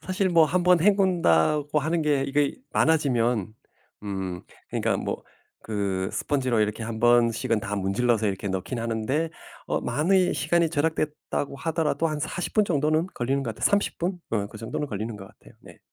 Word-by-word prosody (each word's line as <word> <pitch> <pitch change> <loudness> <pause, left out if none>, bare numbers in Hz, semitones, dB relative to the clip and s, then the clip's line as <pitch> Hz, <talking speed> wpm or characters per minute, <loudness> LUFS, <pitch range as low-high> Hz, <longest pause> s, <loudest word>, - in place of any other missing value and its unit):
사실 185 +1 -1
뭐 170 -3 +5
1 175 +3 0
번 180 -1 +5
헹군다고 155 - +3
하는 160 +3 0
게 145 -3 +2
이게 145 +1 0 0.2
많아지면 120 - +1 0.5
음 95 -3 -4 0.3
그러니까 - - 0
뭐 - - -4 0.4
그 100 -3 -2
스펀지로 130 -5 0
이렇게 105 +1 -1
1 110 0 -5
번씩은 115 -1 +3
다 105 0 -4
문질러서 110 +3 +1
이렇게 95 +1 -4
넣긴 95 +6 -3
하는데 115 +8 -1 0.4
어 - - -1
많이 180 +4 +2
시간이 170 -2 +1
절약됐다고 150 -2 -2
하더라도 160 +2 0
한 155 -2 -3
40 165 +4 -4
분 215 - +4
정도는 155 0 +1
걸리는 135 +3 -1
것 115 -4 -4
같아요. - - +1
30 205 0 +1
분 180 +2 -2
음 105 -3 0
그 110 - -11
정도는 115 +7 -4
걸리는 110 0 -4
것 95 -1 -10
같아요. - - -19
네. - - -15
140 Hz, 330 characters per minute, -25 LUFS, 110-160 Hz, 0.5 s, 뭐